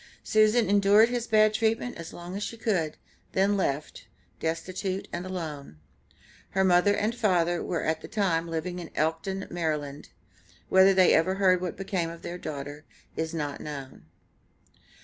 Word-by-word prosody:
Susan 215 +1 +3
endured 205 +3 +5
his 240 -1 -2
bad 215 -1 +4
treatment 225 +3 0
as 165 -1 -8
long 175 +2 -8
as 200 - -4
she 230 - -4
could, 180 -9 -1 0.4
then 195 +2 +3
left, 150 -6 -2 0.3
destitute 185 +4 -3
and 175 +2 -4
alone. 155 - -6 0.8
Her 190 - +5
mother 185 +2 +4
and 215 +3 0
father 175 -7 +1
were 175 - -2
at 160 0 -1
the - - -8
time 170 -6 0
living 165 +2 -3
in 170 - -7
Elkton, 165 +5 -1
Md. 150 -4 -3 0.6
Whether 190 +1 +6
they 185 -1 +6
ever 185 +4 +3
heard 185 -2 +3
what 180 -2 -4
became 185 -3 -2
of 170 0 -10
their 175 +1 -6
daughter 145 -1 -6 0.3
is 160 0 -2
not 150 -4 -4
known. 135 - -8
180 Hz, 155 wpm, -27 LUFS, 160-200 Hz, 0.8 s, Whether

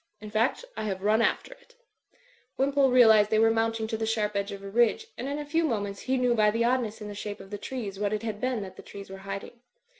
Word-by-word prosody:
In 210 0 -9
fact, 225 - +1
I - - -4
have 190 -2 -3
run 215 +2 +3
after - - 0
it" - - -24 0.8
Wimpole 275 0 +3
realised 220 -4 +6
they 220 - +2
were 225 +1 +5
mounting 225 0 0
to' 220 0 -3
the 220 0 -2
sharp 210 -2 0
edge 200 0 -1
of 200 0 -8
a - - -6
ridge, 240 - +2
and 250 - -5
in 285 +1 -2
a 295 - -5
few 325 +3 +1
moments 205 -8 -2
he 260 +1 -1
knew 250 -1 +2
by 215 -2 +4
the 230 +2 0
oddness 235 -3 0
in 210 - -6
the 205 - -6
shape 205 0 -6
of 195 +1 -12
the 205 - -5
trees 205 -5 -5
what 205 -1 0
it 215 0 -2
bad 215 -2 -4
been 250 -4 -1
that 185 -1 -10
the - - -9
trees 200 -1 -10
were 195 - -8
hiding. 195 +4 -6
220 Hz, 265 wpm, -27 LUFS, 205-250 Hz, 0.8 s, realised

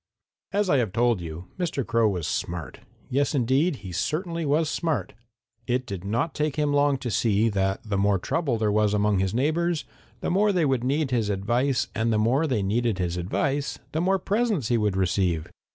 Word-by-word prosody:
"As 205 0 +1
I 145 - +3
have 115 -7 0
told 120 -4 +2
you, 85 +1 -7
Mr. 160 -7 -1
Crow 115 -2 +2
was 90 -5 -2
smart. 85 -6 -4 0.3
Yes, 140 +3 +1
indeed, 135 +6 +2
he 95 - -6
certainly 165 - -2
was 150 +3 +2
smart. 160 0 -2 0.5
It 125 +1 0
did 95 -5 -6
not 115 +11 -1
take 150 -1 -1
him 150 -1 +1
long 145 -1 +3
to 125 -3 -4
see 110 +1 +2
that 95 -2 0
the 105 -3 -2
more 100 0 +3
trouble 135 - -1
there 110 -1 +1
was 105 0 +2
among 105 -1 +2
his 95 +2 0
neighbors 160 +5 0 0.4
the - - -1
more 205 +3 +3
they 180 -5 +2
would 130 -4 +1
need 140 +2 0
his 115 -4 +1
advice, 120 +6 0
and 115 +1 0
the 110 - +2
more 125 +9 +2
they 120 -8 0
needed 110 +1 0
his 90 -2 -1
advice 135 +10 -1
the 160 - -1
more 190 +2 +2
presents 200 - 0
he 120 - +3
would 105 -3 0
receive. 90 -3 +1
120 Hz, 200 wpm, -25 LUFS, 100-150 Hz, 0.5 s, I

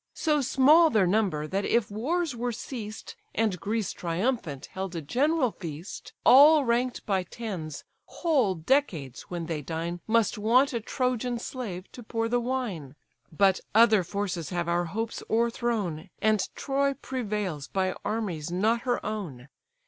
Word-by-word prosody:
So 300 -2 +1
small 280 +6 +5
their 215 -8 +3
number, 180 -6 +1
that 195 +6 -2
if 225 -1 +1
wars 295 +7 -1
were 240 +1 -2
ceased, 220 -2 -7 0.2
And 215 -5 +1
Greece 215 0 -1
triumphant 170 - -2
held 190 -1 -4
a 165 - -3
general 270 - +1
feast, 170 +8 -8
All 290 +2 +8
rank'd 245 +1 0
by 195 -3 +1
tens, 180 -6 -6 0.2
whole 270 - +1
decades 165 - 0
when 175 -2 -4
they 160 -2 -3
dine 165 +4 -4
Must 230 0 +2
want 250 +6 +3
a 235 - -1
Trojan 250 +1 -1
slave 220 -7 -6
to 245 - -10
pour 225 0 -2
the 245 +1 +1
wine. 225 - -3 0.4
But 190 +3 +3 0.2
other 220 -3 +6
forces 180 -3 -3
have 175 -1 -2
our 175 0 +1
hopes 225 +6 -4
o'erthrown, 225 -7 -1
And 215 -2 +2
Troy 275 0 0
prevails 210 - -3
by 190 -1 0
armies 200 -8 -2
not 220 +6 +1
her 245 -1 -1
own. 155 -12 -5
215 Hz, 150 wpm, -27 LUFS, 175-245 Hz, 0.4 s, All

